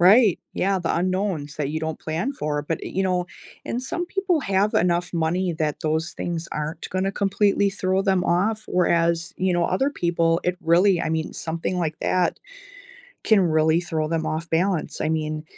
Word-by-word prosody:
Right. 200 +2 +6
Yeah, 195 0 +1
the 170 - -1
unknowns 185 -5 -1
that 145 -2 -1
you 155 +1 -2
don't 160 0 -4
plan 165 - -2
for. 150 - -2
But, 160 +2 -2
i - - -4
you 190 0 -1
know, 180 -1 0 0.4
and 245 - -2
some 350 +7 -3
people 370 -3 0
have 200 -1 +1
enough 175 +1 +1
money 170 +2 0
that 150 -2 -1
those 160 +2 -1
things 170 -1 -4
aren't 155 +2 -4
gonna 190 +1 -1
completely 200 0 +2
throw 190 -1 0
them 190 -2 +2
off. 210 +5 +1
Whereas, 170 -1 +1
you 185 -1 +1
know, 175 -1 +2
other 265 +12 +1
people, 170 -6 +1
it 180 0 0
really 175 +2 +4
I - - -1
mean, 160 0 -2
something 165 +2 -3
like 160 -2 -2
that 180 -1 +1 0.8
can 215 -3 +5
really 160 -1 +3
throw 160 -3 -2
them 160 0 -1
off 160 +2 -3
balance. 175 +1 0
I 155 - 0
mean 155 -1 -2
175 Hz, 185 wpm, -23 LUFS, 160-195 Hz, 0.8 s, Right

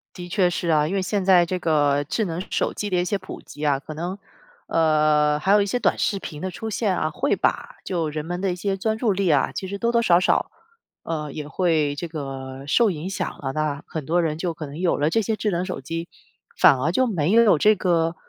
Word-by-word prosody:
的 175 -1 -7
确 180 -1 +2
是 175 0 -3
啊。 150 -1 +3
因 190 - -2
为 195 - +1
现 195 +1 -1
在 185 -2 +5
这 180 +1 -3
个 145 -3 +2
智 220 +9 -1
能 170 -1 -3
手 - - -1
机 205 - -4
的 185 - 0
一 175 - +1
些 205 - 0
普 185 0 -9
及 150 - -10
啊， 140 -2 +3
可 155 - -9
能， 175 +5 -4 0.5
呃， 150 -2 +3
还 190 +6 +1
有 205 0 +6
一 200 - +1
些 205 - -1
短 215 - +1
视 200 - +1
频 150 -5 -8
的 185 - -2
出 220 +5 -6
现 205 -3 0
啊， 155 - 0
会 260 - 0
把 - - -1
就 165 -4 -2
人 150 0 -5
们 175 +1 -4
的 195 -1 0
一 - - -3
些 195 +2 -2
专 220 +3 -1
注 220 -2 +1
力 195 -1 0
啊， 145 -3 +2
其 190 - -4
实 200 +2 -5
多 235 +3 0
多 235 0 +3
少 175 -6 +4
少， 185 - +1 0.5
呃， 150 -3 -4
也 150 - -5
会 155 -2 +1
这 170 +4 -5
个 135 -4 -7
受 225 +10 +3
影 170 +1 -4
响 195 - -2
了。 135 - -3
那 150 -1 -2
很 155 -4 -6
多 175 +4 +2
人 155 -1 -1
就 170 0 -2
可 160 -1 -7
能 145 +3 -9
有 180 -1 +1
了 145 +2 +1
这 225 - +2
些 220 +1 -1
智 210 -1 -1
能 180 +1 -1
手 185 -7 -5
机， 165 +4 -5 0.5
反 135 - +6
而 150 +6 0
就 260 - +3
没 175 -5 0
有 225 -6 +6
这 215 +7 +4
个， 170 -3 +1
170 Hz, 270 characters per minute, -23 LUFS, 150-195 Hz, 0.5 s, 有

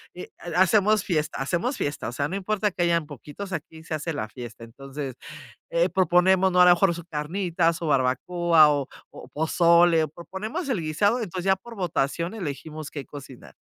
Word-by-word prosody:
y 180 - -7 0.2
ha 175 0 -3
hacemos 210 +2 +4
fiesta 155 -5 -1
hacemos 175 - -1
fiesta, 145 0 -3
o - - -7
sea, 140 +4 -2
no 180 - -5
importa 205 +1 -1
que 180 - -4
hayan 170 -2 +2
poquitos, 150 - -9
aquí 160 -1 -7
se 165 - -6
hace 155 +2 -3
la 110 -7 -3
fiesta. 120 0 -10
Entonces, 135 +3 -7 0.6
eh, - - +2
proponemos, 185 +1 +3
¿no?, 180 - +3
a 180 - +8
lo - - +8
mejor, 175 0 +3
su 170 - -7
carnita, 170 +2 0
su 165 0 -5
barbacoa 155 +4 +3
o 145 -2 -1 0.2
o - - -12
pozole, 170 +1 +4
o - - -5
proponemos 200 - -6
el 225 -11 -1
guisado, 205 +9 +1
entonces 185 -4 -5
ya 190 0 +4
por 230 +4 -13
votación 170 0 -1
elegimos 155 -4 -6
qué 145 -3 -7
cocinar. 135 -3 -12
170 Hz, 190 wpm, -25 LUFS, 150-190 Hz, 0.6 s, a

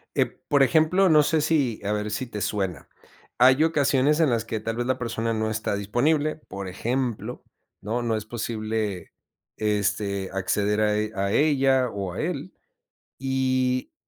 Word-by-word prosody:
Eh, - - +4 0.2
por 145 -1 +3
ejemplo, 160 +7 +4
no 155 -3 +6
sé 160 +2 +1
si, 145 -7 +1
a 105 - 0
ver 105 0 -2
si 125 +4 -3
te 105 -3 -6
suena. 95 -6 -2 0.5
Hay 130 +4 +6
ocasiones 150 -2 +2
en 160 -4 +4
las 115 -1 +1
que, 110 -1 -3
tal 115 +1 -3
vez 120 +1 -2
la 130 0 0
persona 115 -1 -2
no 110 0 -1
está 110 -1 -2
disponible, 145 +10 +1
por 100 -1 -6
ejemplo, 120 +4 -3 0.4
¿no?, 115 +4 -2
no 115 -2 0
es 105 - -6
posible, 110 -4 -3 0.4
este, 105 -2 -1
acceder 105 +2 0
a 105 -1 +2
e 105 0 -1
a 100 0 -1
ella 135 -2 +3
o 100 -4 -4
a - - -6
él, 170 +1 -4 0.6
y, 130 -1 0
115 Hz, 165 wpm, -25 LUFS, 105-135 Hz, 0.6 s, no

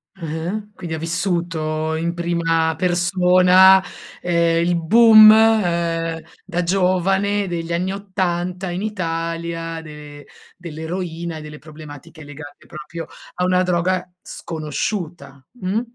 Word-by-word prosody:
Ah-ah. 170 +5 -5
Quindi 170 -5 -6
ha - - -5
vissuto 165 -2 -2
in 170 +1 -2
prima 165 -1 0
persona, 180 +1 +4 0.4
ehm, 170 -1 +1
il 175 0 +1
boom, 215 +5 +7
uhm, 170 -7 +2 0.2
da 180 -2 -3
giovane 195 +2 +1
degli 170 -1 -4
anni 180 +3 -1
'80 185 -2 -3
in 180 +2 -4
Italia 165 -4 -4
de 150 -2 -12 0.3
dell'eroina 170 0 -6
e 155 - -8
delle 150 0 -10
problematiche 155 +1 -12
legate 145 0 -12
proprio 155 +1 -8 0.3
a 180 - -2
una 180 0 +2
droga 180 0 -1
sconosciuta, 160 -3 -6
mh, 190 +4 -1
170 Hz, 115 wpm, -20 LUFS, 165-185 Hz, 0.4 s, boom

